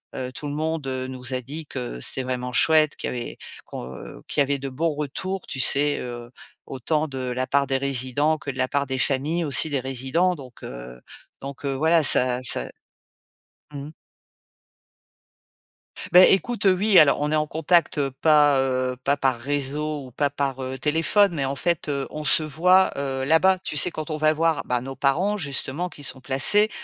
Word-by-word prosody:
heu, 130 -1 -5
tout 150 - -8
le 145 - -5
monde 160 -1 -3
nous 130 0 -4
a 130 - -2
dit 150 +5 -8
que 125 - -7
c'était 130 - +2
vraiment 125 0 -4
chouette 155 +3 +3
qu'il - - -4
avait 120 -1 -6 0.3
qu'on - - -10
qu'il - - 0
y - - +5
avait 140 0 -2
de 135 0 -5
bons 155 +4 -2
retours, 180 +6 -5
tu 135 - -6
sais, 145 +3 +4
heu, 120 -1 -8 0.4
autant 150 +4 -2
de 135 -2 -8
la 130 +1 -3
part 140 0 +1
des 135 - 0
résidents 140 +3 0
que 145 - -6
de 130 - -12
la 130 0 0
part 140 +1 -1
des 130 -1 -3
familles 150 +6 0
aussi 145 +3 +4
des 140 - 0
résidents, 135 +8 -1
donc 130 -5 -14
heu, 60 0 -9 0.4
donc 140 +1 -8
heu, 135 - -1
voilà, 160 +3 +2
ça 125 -2 +3
ça - - +2 1.0
mmh. 140 +1 -7 2.2
Bah 180 +1 +8
écoute, 225 +3 +1
heu, 185 - +5
oui, 200 +1 +4
alors 145 -1 +4
on 150 +1 -1
est - - +1
en 150 0 0
contact, 165 +1 +1
heu, 140 -2 -1
pas, 150 -3 +4
heu, 130 -1 -1
pas 140 +1 +1
par 130 -4 0
réseau 145 +2 -3
ou 125 - -13
pas 145 +3 -1
par, 135 -1 -3
heu, 130 0 -5
téléphone, 165 +7 +1
mais 140 -4 -2
en 135 +1 -3
fait, 170 0 -2
heu, 140 -1 -2
on 155 0 -6
se 155 - +7
voit, 180 +5 +3
heu, 135 -1 -3
là-bas. 175 +6 +3
Tu - - -4
sais, 180 - +5
quand 155 +1 -7
on 155 - -3
va 155 0 +2
voir, 165 -1 0
bah 125 -1 -1
nos 135 +1 -8
parents 160 +10 0
justement 145 +2 -2
qui 145 - -11
sont 130 -1 -4
placés, 140 +12 +3
140 Hz, 195 wpm, -23 LUFS, 130-155 Hz, 2.2 s, Bah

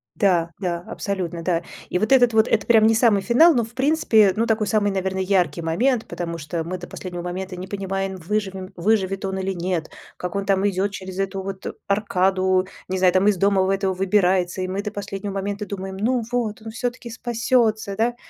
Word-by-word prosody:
Да, 175 -4 +2
да, 175 -3 -2
абсолютно, 175 -4 -4
да. 170 -1 +1 0.3
И 180 - 0
вот 215 +5 -1
этот 245 -3 +5
вот 220 0 +4
это 215 -3 +1
прям 220 -2 +5
не 225 - +4
самый 220 -4 +4
финал, 310 - +5
но 240 -3 +2
в 225 +2 -10
принципе 255 -9 +4
ну 230 +2 +1
такой 220 -1 +1
самый, 205 -1 +1
наверно, 190 -1 -2
яркий 185 -2 +1
момент, 225 +9 +1
потому 170 -1 -5
что 160 +2 -3
мы 180 +2 -5
до 180 - -8
последнего 175 -2 -7
момента 185 +1 -5
не 185 +1 -7
понимаем, 195 -1 -3
выживем 190 +1 -3
выживет 195 +1 0
он 190 0 -2
или 190 0 -2
нет, 175 -2 -3 0.3
как 180 +1 -5
он 200 0 -1
там 195 0 +2
идёт 195 +1 0
через 190 -1 -7
эту 195 0 -2
вот 195 -1 -6 0.2
аркаду, 190 -2 +2 0.2
не 190 +1 -2
знаю, 185 -1 +4
там 190 +2 +3
из 205 -3 +3
дома 195 0 +3
в 190 - +1
этого 195 -1 +1
выбирается, 185 -1 +1
и 185 - -2
мы 195 +2 -2
до 210 0 -4
последнего 200 0 -5
момента 200 +1 -3
думаем: 190 -1 -5
ну 235 +3 0
вот 220 -3 -2
он 220 - -7
всё-таки 240 0 -4
спасётся, 225 -3 0
да, 235 +3 +1
195 Hz, 205 wpm, -22 LUFS, 185-215 Hz, 0.3 s, этот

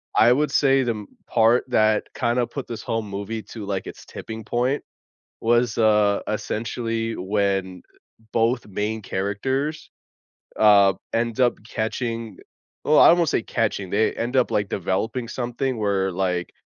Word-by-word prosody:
I 115 - +6
would 150 +3 0
say 135 -1 +3
the 120 - 0
m 105 -3 -6 0.2
part 115 +2 +3
that 110 -3 +3
kinda 120 +1 +1
put 140 - -6
this 115 - -6
whole 115 0 -1
movie 100 +2 -5
to, 110 -3 -7
like, 100 -1 -3
its - - -10
tipping 110 0 -8
point 125 +4 0 0.6
was, 120 0 +2
uh, 105 -2 +3
essentially 115 +1 -2
when 95 -1 -1 0.5
both 115 +1 +1
main 105 +2 -3
characters, 130 +11 -2 0.7
uh, 100 -2 +6 0.2
end 115 +1 -1
up 125 -1 +4
catching 115 -2 -3 0.5
well, 150 +1 +4
I - - +9
won't 170 -2 +2
say - - +1
catching, 105 -6 -2
they 110 +2 +2
end 120 +3 -2
up, 130 - +3
like, 105 -2 0
developing 110 +6 -2
something 125 +2 -2
where, 100 -3 0
like 90 -1 -2
110 Hz, 150 wpm, -23 LUFS, 100-120 Hz, 0.7 s, I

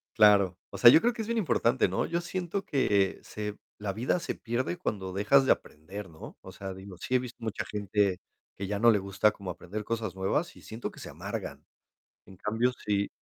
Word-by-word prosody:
Claro. 100 -4 +6
O - - -7
sea, 120 - +10
yo 160 - +8
creo, 240 - +3
que 230 - -5
es - - -8
bien 235 0 -1
importante, 130 - +2
¿no? - - 0
Yo 170 0 -1
siento, 185 +2 -3
que 100 - +2
se 105 -1 -5 0.2
la 105 -1 -3
vida 120 - 0
se - - -3
pierde, 120 -6 -2
cuando 95 -3 -3
dejas 105 +9 +4
de - - +5
aprender, 95 +6 -3
¿no? 80 - -11
O - - -12
sea, 95 -1 -6
digo, 95 0 -10
sí 130 - -2
he - - +5
visto 125 -1 -7
mucha 110 -2 -3
gente, 100 -2 0 0.4
que 100 - -3
ya 100 +1 -2
no 120 +2 +7
le 105 - +3
gusta 100 +2 +2
como 100 -3 -8
aprender 105 +5 -6
cosas 110 -4 -3
nuevas, 95 - -1
y - - -15
siento, 110 +2 -6
que - - -13
se - - -7
amargan. - - -6 0.6
En 95 - -14
cambio, 110 +6 0
si 100 -1 +1
105 Hz, 220 wpm, -29 LUFS, 95-125 Hz, 0.6 s, sea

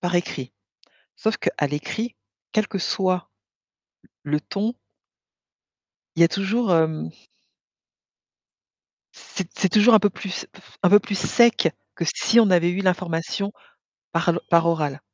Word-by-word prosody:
par 175 0 -2
écrit. 135 -8 -2 0.6
Sauf 220 0 -1
qu'à 145 - -1
l'écrit, 185 - -4 0.4
quel 215 -1 +1
que 195 - -4
soit 185 - -1 0.9
le 150 +1 -1
ton 210 +8 -3 1.4
il - - -2
y 170 - +9
a - - +5
toujours 195 +3 0
hem 160 - +1 2.1
C'est 190 - -7
c'est 190 - +2
toujours 215 +5 +5
un - - +9
peu 205 0 +2
plus 185 0 -6
f 190 - -20
un 180 - +5
peu 205 +3 +8
plus 200 -1 -4
sec 235 -3 +3 0.3
que 170 - -3
si 235 - +4
on 215 -4 +4
avait 175 -1 +4
eu 180 +2 -2
l'information 185 +1 -1 0.6
par 170 +1 0
l 170 0 +1
par 170 -1 +4
oral. 150 -4 -1
185 Hz, 145 wpm, -23 LUFS, 165-205 Hz, 2.1 s, y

